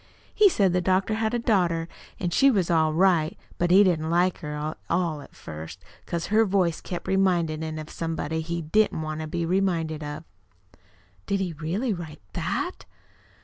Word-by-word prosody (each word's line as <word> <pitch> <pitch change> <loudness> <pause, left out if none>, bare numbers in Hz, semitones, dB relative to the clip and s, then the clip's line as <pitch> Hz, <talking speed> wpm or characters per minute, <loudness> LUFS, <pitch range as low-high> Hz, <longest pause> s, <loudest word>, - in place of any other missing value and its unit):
He 415 -2 +6
said 195 - +2
the 180 - +2
doctor 190 +3 +1
had 220 +1 0
a - - +2
daughter, 175 -8 +1 0.3
an' 175 -2 -1
she 275 +10 +5
was 190 -9 +1
all 160 -2 +3
right; 165 -2 +2 0.2
but 175 - +2
he 190 +3 +7
didn't 160 -4 +1
like 175 +2 +2
her 150 -3 -5
at 150 +1 -4
all 170 -4 0
at - - -15
first, 80 +1 -9 0.2
'cause 170 -1 -2
her 220 +1 +6
voice 185 -5 +1
kept 175 - -6
remindin' 175 -5 +1
him 160 0 -4
of 155 0 -7
somebody 160 -1 -3
he 170 +1 -3
didn't 160 0 +2
want 155 0 -4
to 155 - -4
be 170 +2 -2
reminded 165 -4 0
of." 150 +1 -6 1.0
"Did 200 -1 +1
he 185 -3 -2
really 180 - -2
write 160 - -8
THAT?" - - -3
170 Hz, 185 wpm, -26 LUFS, 155-190 Hz, 1.0 s, he